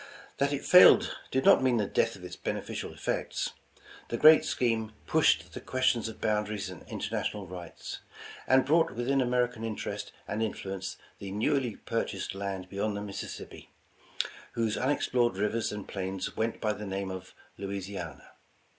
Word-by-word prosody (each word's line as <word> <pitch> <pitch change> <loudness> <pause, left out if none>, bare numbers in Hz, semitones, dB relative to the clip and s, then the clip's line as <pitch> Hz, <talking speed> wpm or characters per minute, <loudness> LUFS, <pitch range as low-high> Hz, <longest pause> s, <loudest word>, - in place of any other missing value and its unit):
That 140 +1 +2
it 145 - -2
failed 180 - +8
did 130 0 0
not - - +7
mean 130 -2 +3
the 105 - +1
death - - +1
of - - -13
its - - -7
beneficial - - -4
effects. - - -2 0.6
The 120 - -1
great 155 +5 +8
scheme 115 -3 0
pushed 85 - +3
the - - -6
questions 130 -3 +1
of 110 - -10
boundaries 105 -2 -1
and 90 - -10
international 105 -2 -3
rights; 90 -2 -8 0.5
and 130 0 +5
brought 160 +4 +3
within 130 +3 +1
American 125 -2 +1
interest 110 -2 -4 0.2
and 105 +2 -2
influence 95 -3 -3 0.2
the 100 - -6
newly 115 +4 0
purchased - - -3
land 95 -1 -4
beyond 100 +2 -2
the - - -4
Mississippi, 100 -1 -7 0.8
whose 115 -2 0
unexplored 125 -5 +1
rivers 105 +3 0
and 105 -1 -6
plains 95 -1 -4
went 115 +1 -1
by 105 -1 +1
the 105 0 -7
name 95 0 -3
of 95 0 -8 0.2
Louisiana. 95 -7 -6
105 Hz, 155 wpm, -30 LUFS, 95-125 Hz, 0.8 s, failed